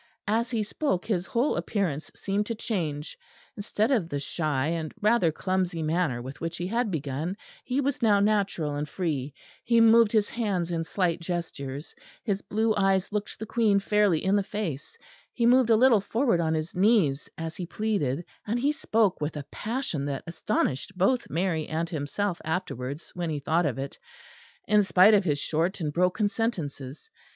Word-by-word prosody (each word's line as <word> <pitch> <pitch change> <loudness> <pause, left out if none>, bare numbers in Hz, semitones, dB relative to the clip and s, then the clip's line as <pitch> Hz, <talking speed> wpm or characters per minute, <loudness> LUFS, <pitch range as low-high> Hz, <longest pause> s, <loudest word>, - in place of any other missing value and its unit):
As 230 +3 +1
he 230 -3 0
spoke 205 - -1
his 190 -5 -1
whole 245 +5 +1
appearance 170 -8 -2
seemed 205 +1 -1
to 230 - -2
change; 165 -10 -3 0.4
instead 210 +3 -1
of 205 -11 +1
the 145 - -2
shy 145 -1 -1
and 165 -2 -2
rather 210 -5 +3
clumsy 180 -1 -1
manner 155 -6 0
with 135 +2 -9
which 165 0 -3
he 175 - -3
had 230 +4 0
begun, 155 +3 -3 0.3
he 255 +2 -1
was 280 -1 -1
now 210 -3 +4
natural 200 -7 +1
and 145 0 -3
free; 150 -5 -2 0.3
he 235 0 +3
moved 230 -1 +6
his 215 -2 +3
hands 195 -7 -2
in 165 -1 -1
slight 175 0 0
gestures; 160 -5 -5 0.3
his 200 -3 -1
blue 220 +1 +1
eyes 195 -1 +2
looked 210 0 -3
the 220 - -5
Queen 220 -2 +2
fairly 200 -4 +2
in 190 +1 +3
the 205 - +3
face; 185 -8 -5 0.4
he 235 - 0
moved 250 0 +5
a 225 - +6
little 230 -2 +5
forward 230 -2 +1
on 160 -1 +1
his 155 +1 -3
knees 185 -8 +2
as 165 -1 -5
he 180 - -5
pleaded, 180 -9 -1 0.2
and 230 +3 0
he 280 +4 +2
spoke 220 - +1
with 150 +1 -2
a 145 - -6
passion 220 - -3
that 140 -1 -3
astonished 170 0 -2
both 240 +7 +2
Mary 165 -3 -1
and 165 +1 -2
himself 170 +5 -2
afterwards 155 -3 -4
when 175 -2 -3
he 155 - -2
thought 160 +3 +1
of 125 - -2
it, 135 +1 -6 0.7
in 210 0 +5
spite 195 +1 +6
of 205 -1 +5
his 145 -4 +1
short 165 +6 -1
and 150 -4 -2
broken 180 +5 +2
sentences. 160 - -4
185 Hz, 180 wpm, -27 LUFS, 155-215 Hz, 0.7 s, moved